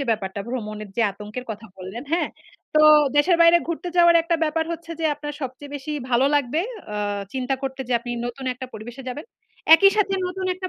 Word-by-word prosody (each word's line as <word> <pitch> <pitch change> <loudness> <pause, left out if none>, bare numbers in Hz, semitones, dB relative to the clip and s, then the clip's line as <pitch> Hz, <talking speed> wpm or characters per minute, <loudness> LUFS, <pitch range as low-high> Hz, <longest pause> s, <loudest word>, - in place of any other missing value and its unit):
যে 275 - -1
ব্যাপারটা, 200 -2 -2
ভ্রমণের 215 -4 -5
যে 230 - +3
আতঙ্কের 210 +5 -8
কথা 220 +1 -7
বললেন, 190 +7 -7
হ্যাঁ? 345 - +1 0.5
তো 305 - +5 0.4
দেশের 335 +4 +4
বাইরে 335 +1 +7
ঘুরতে 340 +1 -3
যাওয়ার 345 -1 +7
একটা 335 0 0
ব্যাপার 320 +1 0
হচ্ছে 335 0 -8
যে, 320 - -2
আপনার 295 0 -7
সবচেয়ে 265 +3 -7
বেশি 285 +2 -6 0.2
ভালো 250 +3 +4
লাগবে 290 +3 +1 0.3
আ - - -3 0.4
চিন্তা 260 +1 -1
করতে 265 0 -4
যে - - -1
আপনি 240 0 -7 0.2
নতুন 245 +2 -7
একটা 260 +1 -7
পরিবেশে 240 +5 -8
যাবেন। 290 +5 -6 0.5
একই 395 +4 +6
সাথে 400 -2 +2
নতুন 370 +1 -4
একটা 370 0 -5
270 Hz, 195 wpm, -23 LUFS, 240-335 Hz, 0.5 s, বাইরে